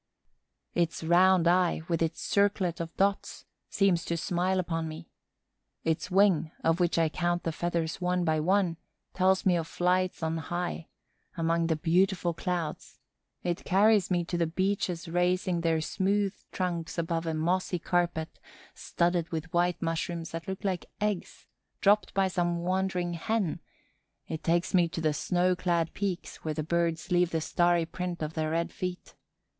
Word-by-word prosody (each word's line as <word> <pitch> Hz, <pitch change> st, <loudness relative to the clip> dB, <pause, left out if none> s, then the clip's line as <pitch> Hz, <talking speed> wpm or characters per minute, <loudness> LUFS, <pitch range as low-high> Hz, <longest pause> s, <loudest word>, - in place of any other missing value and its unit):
Its 170 Hz, -1 st, 0 dB
round 175 Hz, +1 st, +5 dB
eye, 175 Hz, -2 st, +3 dB
with 165 Hz, -2 st, -1 dB
its 165 Hz, 0 st, 0 dB
circlet 200 Hz, -4 st, +1 dB
of 165 Hz, -1 st, -6 dB
dots, 195 Hz, 0 st, 0 dB, 0.2 s
seems 185 Hz, -4 st, +2 dB
to 170 Hz, -, -2 dB
smile 180 Hz, +3 st, 0 dB
upon 165 Hz, -2 st, -2 dB
me. 160 Hz, +1 st, -9 dB, 0.7 s
Its 160 Hz, +2 st, -1 dB
wing, 185 Hz, -4 st, +3 dB
of 165 Hz, +2 st, +2 dB
which 175 Hz, -1 st, +2 dB
I 165 Hz, -1 st, +4 dB
count 175 Hz, +2 st, -1 dB
the 165 Hz, -, -1 dB
feathers 170 Hz, +1 st, -2 dB
one 180 Hz, 0 st, +1 dB
by 160 Hz, -1 st, +2 dB
one, 180 Hz, 0 st, +2 dB, 0.4 s
tells 190 Hz, 0 st, +2 dB
me 185 Hz, -2 st, +4 dB
of 165 Hz, -1 st, -1 dB
flights 180 Hz, 0 st, 0 dB
on 160 Hz, 0 st, 0 dB
high, 175 Hz, 0 st, -4 dB, 0.5 s
among 165 Hz, 0 st, +1 dB
the 160 Hz, -, +1 dB
beautiful 180 Hz, +2 st, +1 dB
clouds; 170 Hz, -2 st, -4 dB, 0.5 s
it 175 Hz, -1 st, -2 dB
carries 205 Hz, 0 st, +4 dB
me 175 Hz, -2 st, +1 dB
to 175 Hz, 0 st, -2 dB
the 170 Hz, -, +2 dB
beeches 185 Hz, 0 st, -1 dB
raising 180 Hz, +1 st, +1 dB
their 165 Hz, -1 st, +1 dB
smooth 195 Hz, +4 st, 0 dB, 0.2 s
trunks 175 Hz, -3 st, -3 dB
above 165 Hz, 0 st, -1 dB
a 160 Hz, -, -1 dB
mossy 180 Hz, +3 st, 0 dB
carpet 170 Hz, -2 st, -1 dB, 0.3 s
studded 170 Hz, -1 st, 0 dB
with 160 Hz, 0 st, -5 dB
white 175 Hz, 0 st, +1 dB
mushrooms 165 Hz, 0 st, -2 dB
that 165 Hz, +3 st, -6 dB
look 190 Hz, +2 st, -5 dB
like 190 Hz, -3 st, -2 dB
eggs, 210 Hz, -3 st, -3 dB, 0.3 s
dropped 205 Hz, +1 st, +3 dB
by 195 Hz, -1 st, +3 dB
some 175 Hz, -2 st, 0 dB
wandering 185 Hz, -1 st, 0 dB
hen; 195 Hz, +1 st, -1 dB, 0.7 s
it 160 Hz, -, -5 dB
takes 170 Hz, +3 st, +1 dB
me 175 Hz, -2 st, +4 dB
to 170 Hz, -, -5 dB
the 155 Hz, -2 st, +1 dB
snow 180 Hz, +4 st, +1 dB
clad 170 Hz, -2 st, 0 dB
peaks 190 Hz, -3 st, -3 dB
where 155 Hz, -1 st, -4 dB
the 155 Hz, -, -2 dB
birds 170 Hz, +1 st, -1 dB
leave 175 Hz, -1 st, +3 dB
the 165 Hz, -, -1 dB
starry 175 Hz, +1 st, +2 dB
print 175 Hz, 0 st, -4 dB
of 155 Hz, +1 st, -4 dB
their 155 Hz, -1 st, -1 dB
red 165 Hz, +1 st, -1 dB
feet. 180 Hz, -1 st, -5 dB
175 Hz, 160 wpm, -29 LUFS, 165-185 Hz, 0.7 s, round